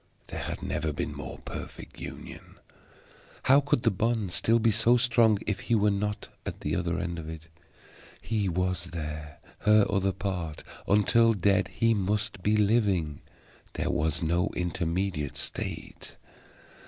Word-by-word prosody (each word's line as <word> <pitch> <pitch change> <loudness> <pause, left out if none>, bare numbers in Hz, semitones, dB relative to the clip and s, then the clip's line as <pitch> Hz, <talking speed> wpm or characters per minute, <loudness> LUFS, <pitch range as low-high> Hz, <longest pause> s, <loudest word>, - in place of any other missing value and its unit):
There - - -6
had - - -5
never 80 0 -1
been - - -3
more - - -7
perfect - - -8
union; - - -9 0.9
how 135 +2 +6
could 135 -3 +1
the 115 - +4
bond 110 -1 0
still 115 +5 +3
be 115 0 +3
so 115 +3 +4
strong 115 -3 +4
if 100 -3 -1
he 120 - 0
were 105 -1 +3
not 105 +1 -2
at - - -6
the - - -1
other 85 -1 -1
end 85 -2 -3
of 80 -1 -7
it? 80 0 -8 0.7
He 105 -4 -1
was 90 0 -1
there, 75 -3 -6 0.2
her 105 -1 +5
other 95 -1 +1
part; 90 -5 -4 0.2
until 115 +3 +4
dead 100 -1 +2
he 115 +3 +2
must 105 -1 -1
be 105 +3 +2
living. 100 -8 +2 0.5
There - - -1
was 80 +2 0
no 85 +4 +1
intermediate 85 -3 -1
state. - - -5
95 Hz, 150 wpm, -28 LUFS, 85-110 Hz, 0.9 s, how